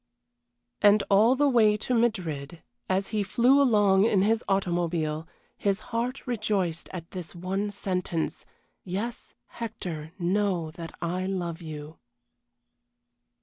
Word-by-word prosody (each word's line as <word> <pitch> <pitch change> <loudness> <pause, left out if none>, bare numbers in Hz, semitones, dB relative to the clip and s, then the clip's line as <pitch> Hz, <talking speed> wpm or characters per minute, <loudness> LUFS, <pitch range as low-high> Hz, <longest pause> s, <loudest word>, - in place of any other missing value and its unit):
And 205 0 +6
all 220 +6 +6
the 290 +2 +3
way 220 -5 +4
to 250 - -2
Madrid, 170 - -1 0.3
as 190 +1 0
he 215 -2 0
flew 245 +8 +4
along 205 -6 +4
in 200 -4 +3
his 220 +2 +2
automobile, 170 -4 0 0.3
his 200 -1 0
heart 245 +3 -2
rejoiced 205 -8 -1
at 170 -3 -7
this 175 -4 -7
one 190 +4 -2
sentence 180 -4 -2 0.4
"Yes, 205 +6 -5
Hector, 180 -9 -6
know 180 -3 0
that 165 -1 -9
I 180 +2 -1
love 175 -3 -3
you!" 155 -1 -8
190 Hz, 120 wpm, -27 LUFS, 170-215 Hz, 0.4 s, And